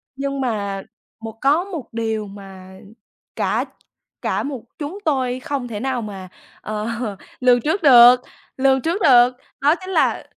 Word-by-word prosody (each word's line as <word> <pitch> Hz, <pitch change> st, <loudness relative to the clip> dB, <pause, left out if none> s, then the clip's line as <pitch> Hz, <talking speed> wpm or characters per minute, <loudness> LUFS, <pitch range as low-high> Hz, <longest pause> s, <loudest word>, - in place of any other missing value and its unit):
Nhưng 275 Hz, 0 st, -3 dB
mà 200 Hz, -5 st, -2 dB, 0.4 s
một 225 Hz, 0 st, -8 dB
có 290 Hz, +6 st, +3 dB
một 340 Hz, -10 st, -7 dB
điều 220 Hz, -2 st, -2 dB
mà 190 Hz, -1 st, -12 dB, 0.6 s
cả -, -, 0 dB, 0.6 s
cả -, -, -1 dB
một 275 Hz, -5 st, -5 dB, 0.2 s
chúng 310 Hz, +7 st, -5 dB
tôi 260 Hz, -4 st, 0 dB
không 265 Hz, -2 st, -4 dB
thể 210 Hz, -3 st, -5 dB
nào 260 Hz, -1 st, -2 dB
mà, 195 Hz, -4 st, -8 dB, 0.3 s
ờ, 215 Hz, +1 st, -4 dB, 0.5 s
lường 250 Hz, -1 st, +4 dB
trước 325 Hz, -, -1 dB
được 250 Hz, -2 st, +8 dB, 0.4 s
lường 265 Hz, 0 st, +3 dB
trước 345 Hz, +5 st, -2 dB
được 245 Hz, -1 st, +6 dB, 0.3 s
đó 295 Hz, +3 st, +4 dB
chính 370 Hz, -, -8 dB
là -, -, +1 dB
250 Hz, 150 wpm, -20 LUFS, 215-280 Hz, 0.6 s, được